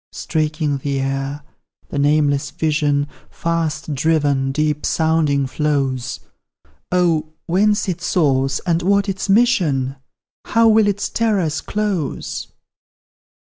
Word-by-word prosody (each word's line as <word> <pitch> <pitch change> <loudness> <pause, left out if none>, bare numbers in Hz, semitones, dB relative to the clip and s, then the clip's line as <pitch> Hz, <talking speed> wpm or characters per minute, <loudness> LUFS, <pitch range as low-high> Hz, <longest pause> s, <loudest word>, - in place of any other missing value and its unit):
Streaking 155 -2 -1
the 140 0 -2
air, 135 +2 -3 0.5
the 145 - -3
nameless 145 0 +2
vision, 150 -2 0 0.2
Fast 160 -2 -2
driven, 145 -2 +1
deep 150 +1 0
sounding, 160 -4 +1
flows; 135 -3 -1 0.7
Oh! 165 -4 +1
whence 205 +5 +2
its 175 -1 -3
source, 135 -5 +2
and 170 -2 +1
what 200 +2 +2
its 195 +1 -3
mission? 165 - +2 0.5
How 230 0 +3
will 220 -1 +5
its 205 0 0
terrors 195 -9 0
close? 200 -9 -3
155 Hz, 105 wpm, -19 LUFS, 140-180 Hz, 0.7 s, will